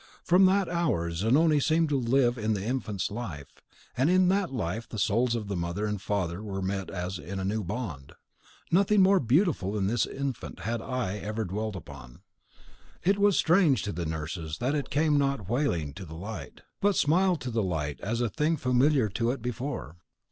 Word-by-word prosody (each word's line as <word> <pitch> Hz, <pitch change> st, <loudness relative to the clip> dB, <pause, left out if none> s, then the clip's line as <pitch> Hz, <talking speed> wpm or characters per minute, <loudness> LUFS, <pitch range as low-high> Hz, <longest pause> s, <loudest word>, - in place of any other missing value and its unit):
From 180 Hz, +2 st, +5 dB
that 195 Hz, 0 st, +2 dB
hour 160 Hz, -, 0 dB
Zanoni 140 Hz, -, +3 dB
seemed 160 Hz, +2 st, +2 dB
to 140 Hz, -2 st, +1 dB
live 120 Hz, 0 st, +2 dB
in 110 Hz, -2 st, -1 dB
the 100 Hz, 0 st, -4 dB
infant's 110 Hz, -6 st, -2 dB
life, 90 Hz, -, -7 dB, 0.3 s
and 135 Hz, +5 st, +2 dB
in 185 Hz, 0 st, +4 dB
that 195 Hz, -3 st, +1 dB
life 110 Hz, -2 st, -3 dB
the 110 Hz, -, -6 dB
souls 115 Hz, +4 st, +2 dB
of 110 Hz, -3 st, -3 dB
mother 85 Hz, +4 st, -2 dB
and 105 Hz, -2 st, -2 dB
father 95 Hz, -3 st, -2 dB
met 95 Hz, -2 st, -3 dB
as 90 Hz, -1 st, -4 dB
in 95 Hz, +7 st, -6 dB
a 95 Hz, -, -2 dB
new 105 Hz, +2 st, -1 dB
bond. 90 Hz, -, -5 dB, 0.6 s
Nothing 200 Hz, +3 st, +4 dB
more 195 Hz, 0 st, +5 dB
beautiful 135 Hz, -, +1 dB
than 105 Hz, -3 st, 0 dB
this 115 Hz, +5 st, +1 dB
infant 135 Hz, -3 st, -5 dB
had 115 Hz, +1 st, -2 dB
eye 120 Hz, -7 st, -2 dB
ever 110 Hz, +2 st, -3 dB
dwelt 105 Hz, +3 st, -3 dB
upon. 70 Hz, -8 st, -11 dB, 0.8 s
It 195 Hz, +3 st, +2 dB
was 205 Hz, -2 st, +4 dB
strange 160 Hz, -, +4 dB
to 105 Hz, -, -3 dB
the 85 Hz, -4 st, -3 dB
nurses 80 Hz, 0 st, -4 dB
that 130 Hz, +4 st, 0 dB
it 145 Hz, -2 st, -2 dB
came 150 Hz, 0 st, +2 dB
not 140 Hz, -8 st, -1 dB
wailing 100 Hz, -, 0 dB
to 95 Hz, -, -8 dB
the 80 Hz, -1 st, -9 dB
light, 90 Hz, -3 st, -7 dB, 0.2 s
but 205 Hz, 0 st, +3 dB
smiled 175 Hz, +3 st, +3 dB
to 125 Hz, -, -4 dB
the 115 Hz, -1 st, 0 dB
light 80 Hz, -7 st, -2 dB
as 115 Hz, +4 st, -2 dB
a 120 Hz, -, +2 dB
thing 155 Hz, -, 0 dB
familiar 130 Hz, -1 st, +3 dB
to 115 Hz, +4 st, -1 dB
it 125 Hz, -2 st, -3 dB
before. 120 Hz, -, -4 dB
115 Hz, 190 wpm, -28 LUFS, 95-145 Hz, 0.8 s, From